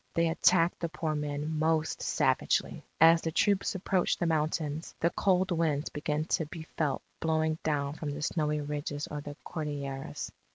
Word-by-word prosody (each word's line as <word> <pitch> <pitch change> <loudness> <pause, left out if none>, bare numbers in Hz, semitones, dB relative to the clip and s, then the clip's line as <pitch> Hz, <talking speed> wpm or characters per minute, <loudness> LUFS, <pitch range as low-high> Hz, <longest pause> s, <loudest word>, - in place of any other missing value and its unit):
They 165 0 +3
attacked 170 +1 +3
the 170 - -2
poor 160 -2 -2
men 150 +1 -2
most 160 0 +1
savagely. - - +1 0.2
As 165 +1 +7
the 160 - -2
troops 200 +4 +2
approached 185 -1 +1
the - - +1
mountains, 155 -1 -1
the 170 - +2
cold 190 -1 +2
winds 160 -4 +1
began 150 +1 -1
to 160 -2 0
be 160 +1 -7
felt 150 -4 0 0.2
blowing 160 0 +1
down 145 -2 0
from 155 -1 -5
the 145 +1 -4
snowy 150 -1 0
ridges 145 0 -3
of 150 -1 -6
the 145 - -6
Cordilleras. 140 -3 -4
155 Hz, 165 wpm, -30 LUFS, 150-165 Hz, 0.2 s, As